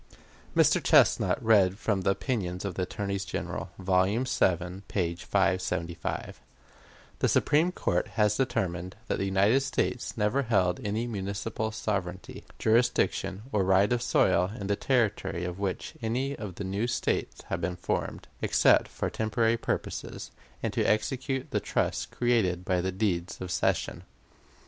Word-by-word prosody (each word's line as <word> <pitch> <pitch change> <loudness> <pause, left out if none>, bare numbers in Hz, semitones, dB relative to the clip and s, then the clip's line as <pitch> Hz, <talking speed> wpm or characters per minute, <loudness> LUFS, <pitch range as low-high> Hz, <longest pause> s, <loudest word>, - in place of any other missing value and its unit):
Mr. - - +4
Chesnut - - +4
read 100 -4 +4
from 105 -3 0
the 95 - +1
"Opinions 95 -4 -2
of 100 - -2
the 90 - -3
Attorneys 100 +1 -2
General," 90 -1 -4
vol. 95 -1 +3
vii, 95 -5 0
page 85 -3 -2
575: 90 -3 -1 0.8
"The - - +3
Supreme 160 +5 +3
Court 90 - 0
has 105 -1 +3
determined 90 -8 -1
that - - -1
the 95 - 0
United 100 +6 +3
States 130 -3 -2
never 105 +6 +2
held 95 -8 +1
any 105 +3 -1
municipal 110 +1 -3
sovereignty, 95 -4 -4
jurisdiction, 110 -3 +1
or 105 -2 +2
right 95 +4 +4
of 120 - 0
soil 90 -5 +3
in 100 - -4
the 100 +1 +1
territory 105 -8 0
of 90 +1 -5
which 95 -2 -3
any 130 +5 -1
of 100 -5 -7
the 100 - -5
new 100 +5 -1
States 120 - -2
have 85 - -2
been 90 +2 -2
formed, 90 - -3
except - - +4
for - - -3
temporary 110 +1 +1
purposes, 115 - -4 0.3
and - - -1
to - - +1
execute 130 +5 -1
the - - +1
trusts - - -1
created 100 -8 +1
by 90 -1 +1
the 95 +1 -1
deeds 90 -3 -1
of 90 -1 -5
cession.... - - 0
100 Hz, 150 wpm, -28 LUFS, 90-115 Hz, 0.8 s, Mr